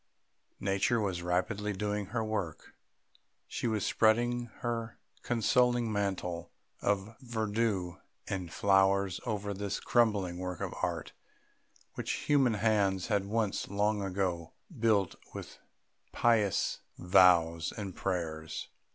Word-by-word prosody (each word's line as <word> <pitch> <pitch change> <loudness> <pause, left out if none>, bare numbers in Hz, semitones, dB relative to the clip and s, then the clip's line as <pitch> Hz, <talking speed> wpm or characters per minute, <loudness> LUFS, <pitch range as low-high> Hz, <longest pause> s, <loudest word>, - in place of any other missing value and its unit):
Nature 100 +4 +1
was 95 -5 -1
rapidly 100 +4 -1
doing 105 0 -2
her 115 +2 -2
work; 105 -7 -4 0.7
she - - -3
was 110 -3 0
spreading 120 +2 +2
her 115 -1 -3 0.2
consoling 120 0 +2
mantle 90 -4 -2 0.3
of 100 +2 0
verdure 110 -6 -1 0.3
and 90 -4 -3
flowers 95 0 +3
over 105 -2 -2
this 100 0 -3
crumbling 100 -7 +2
work 90 -1 -4
of - - -3
art, - - -2 0.8
which - - -3
human 135 -6 +4
hands 100 -3 +1
had 100 -2 +1
once, 105 -1 -1
long 105 +1 +1
ago, 90 -4 -2 0.2
built 110 -6 +2 0.2
with - - -8 0.5
pious 110 -5 +2 0.2
vows 85 -2 +4
and 100 -4 -5
prayers. 80 -4 -3
100 Hz, 110 wpm, -31 LUFS, 95-110 Hz, 0.8 s, human